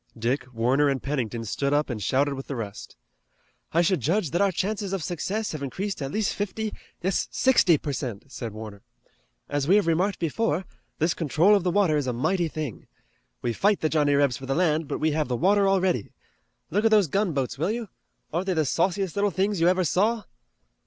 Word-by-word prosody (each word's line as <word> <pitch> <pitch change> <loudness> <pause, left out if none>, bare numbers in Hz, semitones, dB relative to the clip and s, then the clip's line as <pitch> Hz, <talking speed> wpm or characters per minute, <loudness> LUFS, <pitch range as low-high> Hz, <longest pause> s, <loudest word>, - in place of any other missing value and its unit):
Dick, 125 +3 -1
Warner 125 +5 +2
and 135 -1 -2
Pennington 120 -5 -2
stood 140 +6 -1
up 150 +1 +2
and 115 -5 -4
shouted 140 +7 +1
with 135 0 -7
the 140 - -4
rest. 105 -3 -7 0.8
"I 170 +2 +3
should 185 0 +2
judge 165 - 0
that 175 +4 +1
our 200 -1 +3
chances 200 +1 -2
of 190 -5 -2
success 200 +7 -2
have 155 - -6
increased 185 +7 -4
at 135 0 -3
least 215 +2 0
fifty, 210 +2 -3 0.3
yes 190 +1 0
sixty, 215 -11 +4
per 145 0 -4
cent," 120 -7 -4
said 115 -4 -5
Warner. 105 -1 -9 0.7
"As 145 -1 -1
we 190 - +5
have 210 - +4
remarked 180 +5 +1
before, 180 +2 -1 0.3
this 165 +3 +1
control 165 +5 +3
of 200 - +1
the 180 - +1
water 180 -4 +3
is 145 -3 -1
a 125 - 0
mighty 175 +8 0
thing. 155 -7 -6 0.6
We 120 - 0
fight 205 - +2
the 155 - +1
Johnnie 145 -2 +2
Rebs 140 -4 +2
for 135 - -9
the 135 - 0
land, 160 -3 +1
but - - -2
we 155 - +2
have 150 -1 0
the 125 - -1
water 200 - +3
already. 185 - +1 0.6
Look 205 +3 +1
at 225 - +5
those 215 -3 +5
gunboats, 145 -8 -1
will 165 - +1
you? 230 0 -3 0.5
Aren't 175 +4 -1
they 185 - +1
the 155 -1 +2
sauciest 180 +5 0
little 205 0 +2
things 195 0 0
you 170 - +5
ever 185 +1 +3
saw?" 210 +6 +1
160 Hz, 210 wpm, -26 LUFS, 135-195 Hz, 0.8 s, we